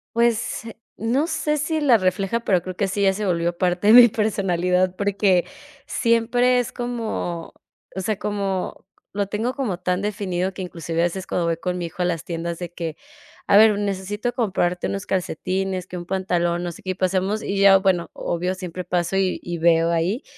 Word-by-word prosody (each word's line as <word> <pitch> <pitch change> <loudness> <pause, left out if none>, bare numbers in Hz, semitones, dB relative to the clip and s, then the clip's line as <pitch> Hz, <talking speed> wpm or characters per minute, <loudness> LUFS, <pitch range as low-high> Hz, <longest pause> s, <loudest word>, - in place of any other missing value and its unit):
Pues, 235 -1 +1 0.3
no 245 +7 +1
sé 310 -2 -1
si 315 +2 -1
la 270 -6 +5
refleja, 195 +3 0
pero 185 -6 +2
creo 185 +1 -7
que 195 +1 0
sí 200 +2 -1
ya 195 -1 +4
se 210 +2 -3
volvió 170 -2 0
parte 180 +2 0
de 215 - +8
mi 245 0 +10
personalidad, 185 -4 +1
porque 200 -3 +2 0.4
siempre 245 +2 +2
es 245 - -2
como, 225 -8 -4 0.4
o 190 - -2
sea, 210 +2 -2
como 200 -4 -3 0.3
lo 200 0 -1
tengo 220 +5 -2
como 225 -11 -2
tan 180 +1 -1
definido 195 -3 -2
que 190 - -7
inclusive 170 -2 -4
a - - +3
veces 185 +2 -4
cuando 175 - -1
voy 165 -1 0
con 180 +1 -3
mi 175 - -3
hijo 180 +3 -7
a - - +2
las 170 -3 -2
tiendas 170 0 -4
de 175 -1 -6
que: 165 -3 -5 0.5
"A - - +4
ver, 215 -1 +6
necesito 205 +4 -2
comprarte 190 -7 0
unos 195 -1 -4
calcetines, 185 +1 -2
que 180 - -7
un 175 - -7
pantalón", 175 -2 0
no 175 - -3
sé - - -13
qué, 185 - -2
y - - -1
pasemos, 190 +3 0
y 200 - -3
ya, 195 -1 +7
bueno, 190 -3 +1
obvio 180 +2 -2
siempre 185 -1 -6
paso 175 +1 -1
y 190 -1 +1
y 175 -1 -5
veo 165 0 +4
ahí, 175 - 0
190 Hz, 195 wpm, -22 LUFS, 175-210 Hz, 0.5 s, mi